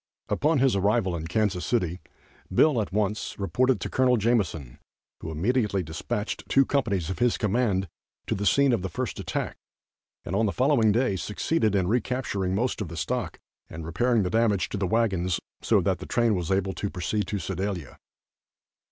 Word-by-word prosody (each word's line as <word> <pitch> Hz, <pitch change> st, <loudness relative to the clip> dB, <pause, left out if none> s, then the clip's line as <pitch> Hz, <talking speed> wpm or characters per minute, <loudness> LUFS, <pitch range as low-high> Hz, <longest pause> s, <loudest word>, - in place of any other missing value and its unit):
Upon 155 Hz, +1 st, +2 dB
his 135 Hz, -4 st, +3 dB
arrival 100 Hz, -1 st, +1 dB
in 80 Hz, -1 st, -4 dB
Kansas 95 Hz, -1 st, 0 dB
City 90 Hz, -7 st, 0 dB, 0.5 s
Bill 125 Hz, +5 st, +4 dB
at 100 Hz, -, -4 dB
once 105 Hz, +1 st, -1 dB
reported 125 Hz, +6 st, +1 dB
to -, -, -3 dB
Col. 125 Hz, -1 st, +3 dB
Jameson, 95 Hz, -, 0 dB, 0.4 s
who -, -, -6 dB
immediately 100 Hz, +4 st, 0 dB
dispatched 80 Hz, +6 st, -4 dB
two 135 Hz, 0 st, +5 dB
companies 100 Hz, -, 0 dB
of 95 Hz, -, -5 dB
his 120 Hz, -1 st, +2 dB
command 105 Hz, -3 st, +1 dB, 0.4 s
to -, -, -1 dB
the 100 Hz, +1 st, -1 dB
scene 140 Hz, -2 st, +4 dB
of 115 Hz, -, +1 dB
the 95 Hz, -, -3 dB
first -, -, -4 dB
attack, -, -, -3 dB, 0.7 s
and 90 Hz, -, -3 dB
on 110 Hz, +2 st, +2 dB
the -, -, 0 dB
following 125 Hz, -4 st, +3 dB
day 110 Hz, -3 st, +1 dB
succeeded 105 Hz, -, 0 dB
in 95 Hz, -2 st, +2 dB
recapturing 110 Hz, -5 st, -1 dB
most 120 Hz, +2 st, -1 dB
of 100 Hz, -, -3 dB
the 85 Hz, +1 st, -8 dB
stock -, -, -2 dB, 0.3 s
and 80 Hz, 0 st, -7 dB
repairing 115 Hz, +7 st, +1 dB
the 90 Hz, -, -2 dB
damage 110 Hz, -4 st, +2 dB
to -, -, -3 dB
the 95 Hz, -1 st, 0 dB
wagons, 95 Hz, -5 st, +1 dB, 0.2 s
so -, -, +3 dB
that -, -, 0 dB
the -, -, -8 dB
train 120 Hz, -2 st, +2 dB
was 90 Hz, -4 st, -2 dB
able 95 Hz, 0 st, +1 dB
to 100 Hz, -, -3 dB
proceed 100 Hz, +3 st, -2 dB
to 105 Hz, -, -2 dB
Sedalia. 95 Hz, -5 st, -4 dB
105 Hz, 180 wpm, -26 LUFS, 95-120 Hz, 0.7 s, two